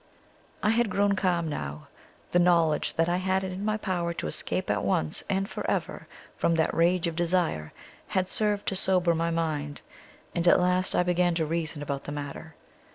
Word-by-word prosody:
I 210 Hz, -, +4 dB
had 235 Hz, -1 st, +2 dB
grown 200 Hz, +1 st, +2 dB
calm 175 Hz, -3 st, +1 dB
now: 75 Hz, -, -5 dB, 0.4 s
the 175 Hz, -, +4 dB
knowledge 170 Hz, -3 st, +3 dB
that 165 Hz, 0 st, +2 dB
I 175 Hz, +1 st, +1 dB
had 190 Hz, +1 st, 0 dB
it 190 Hz, -, -3 dB
in 185 Hz, +2 st, -5 dB
my 215 Hz, 0 st, 0 dB
power 175 Hz, -5 st, -2 dB
to -, -, -4 dB
escape 75 Hz, -, -2 dB
at -, -, 0 dB
once 80 Hz, -1 st, 0 dB
and 195 Hz, 0 st, 0 dB
for -, -, -5 dB
eyer -, -, -2 dB, 0.3 s
from 170 Hz, -, +1 dB
that 160 Hz, -1 st, +1 dB
rage 175 Hz, +1 st, +2 dB
of 165 Hz, -1 st, -2 dB
desire, 170 Hz, -, 0 dB, 0.4 s
had 185 Hz, -1 st, 0 dB
served 205 Hz, 0 st, -1 dB
to 195 Hz, -, -3 dB
sober 185 Hz, -2 st, +3 dB
my 165 Hz, +1 st, 0 dB
mind, 155 Hz, -3 st, -2 dB, 0.5 s
and 170 Hz, 0 st, 0 dB
at -, -, +7 dB
last 180 Hz, +1 st, +2 dB
I -, -, +4 dB
began 180 Hz, -1 st, +2 dB
to 165 Hz, -1 st, 0 dB
reason 155 Hz, -2 st, -2 dB
about 140 Hz, -1 st, -4 dB
the -, -, -5 dB
matter. 145 Hz, +2 st, -7 dB
175 Hz, 195 wpm, -27 LUFS, 160-185 Hz, 0.5 s, at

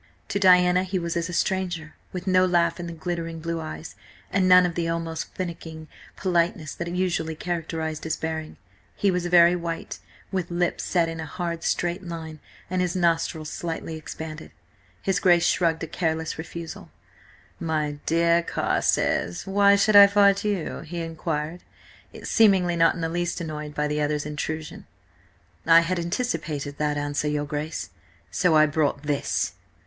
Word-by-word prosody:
To 200 Hz, -, -1 dB
Diana 180 Hz, -1 st, +5 dB
he 190 Hz, 0 st, -2 dB
was 170 Hz, -1 st, -3 dB
as 170 Hz, 0 st, -1 dB
a -, -, -5 dB
stranger, 175 Hz, -4 st, -1 dB, 0.2 s
with 180 Hz, -1 st, -6 dB
no 185 Hz, -1 st, +4 dB
laugh 170 Hz, -1 st, +2 dB
in 175 Hz, -, -5 dB
the -, -, -5 dB
glittering 165 Hz, 0 st, -4 dB
blue 165 Hz, +1 st, -3 dB
eyes, 155 Hz, +1 st, -7 dB, 0.4 s
and 185 Hz, -1 st, +2 dB
none 180 Hz, 0 st, +8 dB
of 175 Hz, -, -1 dB
the 165 Hz, 0 st, -1 dB
almost 165 Hz, -1 st, -3 dB
finicking 165 Hz, -3 st, -6 dB, 0.3 s
politeness 170 Hz, -4 st, 0 dB
that 170 Hz, -, -5 dB
usually 170 Hz, -3 st, -1 dB
characterised 160 Hz, -2 st, -3 dB
his 160 Hz, -, -2 dB
bearing. 160 Hz, -1 st, -4 dB, 0.4 s
He 200 Hz, -, +2 dB
was 180 Hz, -1 st, -1 dB
very 175 Hz, 0 st, +6 dB
white, 170 Hz, -1 st, -5 dB, 0.3 s
with 185 Hz, -3 st, -2 dB
lips 175 Hz, 0 st, -1 dB
set 170 Hz, -3 st, +2 dB
in 165 Hz, 0 st, -5 dB
a 160 Hz, -, -5 dB
hard 170 Hz, -1 st, -4 dB
straight 175 Hz, +2 st, 0 dB
line, 160 Hz, -3 st, -7 dB, 0.3 s
and 185 Hz, +1 st, -1 dB
his 180 Hz, -1 st, -1 dB
nostrils 165 Hz, -3 st, 0 dB
slightly 165 Hz, -1 st, -4 dB
expanded. 155 Hz, 0 st, -7 dB, 0.5 s
His 190 Hz, -1 st, +1 dB
Grace 175 Hz, -2 st, +4 dB
shrugged 165 Hz, -2 st, +1 dB
a -, -, -3 dB
careless 160 Hz, -1 st, -2 dB
refusal. 165 Hz, 0 st, -7 dB, 0.7 s
"My 155 Hz, -3 st, -2 dB
dear 170 Hz, +1 st, +3 dB
Carstares, 85 Hz, -, 0 dB
why 200 Hz, +1 st, +5 dB
should 205 Hz, +1 st, +3 dB
I 200 Hz, 0 st, +11 dB
fight 200 Hz, -1 st, +4 dB
you?" 205 Hz, -6 st, -2 dB
he 170 Hz, +2 st, -6 dB
inquired, 160 Hz, 0 st, -3 dB, 0.6 s
seemingly 190 Hz, -5 st, +4 dB
not 165 Hz, 0 st, +4 dB
in 170 Hz, -, -5 dB
the 165 Hz, -, 0 dB
least 175 Hz, +2 st, -2 dB
annoyed 150 Hz, -3 st, -6 dB
by 150 Hz, 0 st, 0 dB
the 150 Hz, 0 st, -1 dB
other's 150 Hz, 0 st, -1 dB
intrusion. 150 Hz, +1 st, -5 dB, 0.8 s
"I 165 Hz, 0 st, +8 dB
had 175 Hz, +1 st, -1 dB
anticipated 165 Hz, -, -3 dB
that 150 Hz, -1 st, 0 dB
answer, 145 Hz, +1 st, -1 dB
your 150 Hz, 0 st, -1 dB
Grace. 150 Hz, -, -4 dB, 0.4 s
So 175 Hz, -4 st, +2 dB
I 155 Hz, 0 st, +7 dB
brought 145 Hz, -1 st, 0 dB
this!" 145 Hz, -1 st, -1 dB
170 Hz, 165 wpm, -25 LUFS, 160-180 Hz, 0.8 s, I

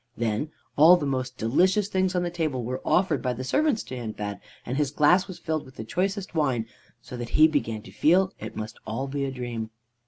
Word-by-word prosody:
Then 115 Hz, +5 st, -1 dB, 0.3 s
all 165 Hz, +5 st, +8 dB
the 155 Hz, -, -3 dB
most 130 Hz, -2 st, -2 dB
delicious 185 Hz, -, +2 dB
things 190 Hz, -2 st, 0 dB
on 180 Hz, -, +1 dB
the 175 Hz, -, -2 dB
table 155 Hz, -7 st, -2 dB
were 125 Hz, +3 st, -4 dB
offered 175 Hz, -6 st, +2 dB
by 125 Hz, -, 0 dB
the 125 Hz, +2 st, -5 dB
servants 285 Hz, -, +1 dB
to 130 Hz, -, -7 dB
Hindbad, 105 Hz, -4 st, -5 dB, 0.3 s
and 125 Hz, -, -3 dB
his 145 Hz, -1 st, +1 dB
glass 155 Hz, +7 st, +4 dB
was 185 Hz, -3 st, -8 dB
filled 160 Hz, -3 st, -2 dB
with 130 Hz, -, -16 dB
the -, -, -6 dB
choicest 195 Hz, -, -2 dB
wine, 135 Hz, -8 st, +1 dB, 0.4 s
so -, -, -8 dB
that 120 Hz, -1 st, -5 dB
he 155 Hz, +1 st, +8 dB
began 115 Hz, -8 st, -2 dB
to -, -, -12 dB
feel 185 Hz, +4 st, +3 dB
it -, -, -7 dB
must 110 Hz, 0 st, -6 dB
all 115 Hz, +5 st, -3 dB
be 140 Hz, 0 st, -2 dB
a 135 Hz, -, -3 dB
dream. 120 Hz, -3 st, -4 dB
145 Hz, 220 wpm, -26 LUFS, 120-180 Hz, 0.4 s, all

